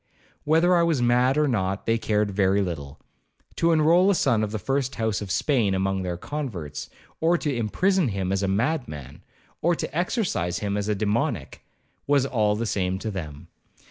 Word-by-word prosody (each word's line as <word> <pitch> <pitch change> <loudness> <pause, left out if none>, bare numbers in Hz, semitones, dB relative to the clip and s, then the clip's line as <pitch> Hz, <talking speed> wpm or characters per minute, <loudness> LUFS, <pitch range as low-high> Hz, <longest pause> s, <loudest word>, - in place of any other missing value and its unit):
Whether 165 +4 +4
I 170 - +4
was 165 -5 +2
mad 125 +3 +3
or 150 -1 +3
not, 95 -5 -1
they 115 0 +1
cared 105 -2 0
very 95 0 +2
little; 75 -5 -6 0.6
to 170 - +3
enroll 165 +4 +4
a 200 - +3
son 120 -9 +2
of 105 - -2
the 110 - -2
first 135 +5 -1
house 110 -3 -1
of 100 - -6
Spain 105 0 +1
among 95 0 0
their 90 -2 -3
converts, 90 - -5 0.3
or 170 +2 +3
to 145 -5 -2
imprison 175 - +1
him 95 -4 -2
as 95 0 0
a 100 - 0
madman, 100 - -2 0.4
or 170 +1 +2
to 150 - -5
exorcise 175 - -1
him 100 -1 -2
as 105 0 -2
a 105 - +1
demoniac, 105 +3 -2 0.5
was 140 -2 +3
all 110 -6 +1
the 115 +2 -2
same 95 -3 -1
to 110 +3 -4
them. 80 -4 -7
110 Hz, 185 wpm, -25 LUFS, 95-145 Hz, 0.6 s, Whether